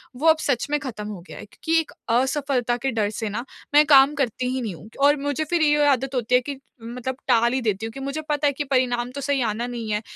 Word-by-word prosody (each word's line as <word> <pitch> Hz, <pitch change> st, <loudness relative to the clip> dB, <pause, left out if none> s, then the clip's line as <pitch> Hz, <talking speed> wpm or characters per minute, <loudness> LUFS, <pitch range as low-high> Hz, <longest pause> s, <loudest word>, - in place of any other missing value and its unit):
वो 295 Hz, +6 st, 0 dB
अब 320 Hz, 0 st, +6 dB
सच 275 Hz, -5 st, 0 dB
में 295 Hz, 0 st, +1 dB
खत्म 230 Hz, -6 st, -6 dB
हो 205 Hz, -4 st, -7 dB
गया -, -, -10 dB
है -, -, -9 dB
क्योंकि 325 Hz, +10 st, 0 dB
एक 320 Hz, -, -4 dB, 0.3 s
असफलता 260 Hz, -2 st, 0 dB
के 265 Hz, +2 st, -2 dB
डर 215 Hz, -3 st, 0 dB
से 220 Hz, 0 st, -4 dB
ना 230 Hz, +4 st, -4 dB, 0.3 s
मैं 300 Hz, +1 st, +7 dB
काम 280 Hz, -1 st, +6 dB
करती 255 Hz, -3 st, -1 dB
ही 260 Hz, -, -2 dB
नहीं 215 Hz, -7 st, -4 dB
हूँ। 210 Hz, -, -13 dB
और 290 Hz, +1 st, +5 dB
मुझे 285 Hz, +1 st, -1 dB
फिर 345 Hz, -1 st, +1 dB
ये 295 Hz, -1 st, +4 dB
आदत 270 Hz, -1 st, +1 dB
होती 245 Hz, 0 st, +1 dB
है 250 Hz, -, +4 dB
कि 275 Hz, +1 st, -6 dB, 0.2 s
मतलब 250 Hz, +2 st, -5 dB
टाल 235 Hz, -1 st, +3 dB
ही 260 Hz, -, 0 dB
देती 215 Hz, -2 st, -1 dB
हूँ 225 Hz, -, -5 dB
कि 275 Hz, -, -8 dB
मुझे 275 Hz, +3 st, -4 dB
पता 295 Hz, 0 st, +1 dB
है 285 Hz, -, +1 dB
कि 285 Hz, -, -3 dB
परिणाम 250 Hz, -3 st, 0 dB
तो 280 Hz, +2 st, -6 dB
सही 280 Hz, -1 st, 0 dB
आना 230 Hz, +1 st, -1 dB
नहीं 235 Hz, -3 st, -5 dB
है। 210 Hz, 0 st, 0 dB
260 Hz, 265 wpm, -23 LUFS, 235-285 Hz, 0.3 s, मैं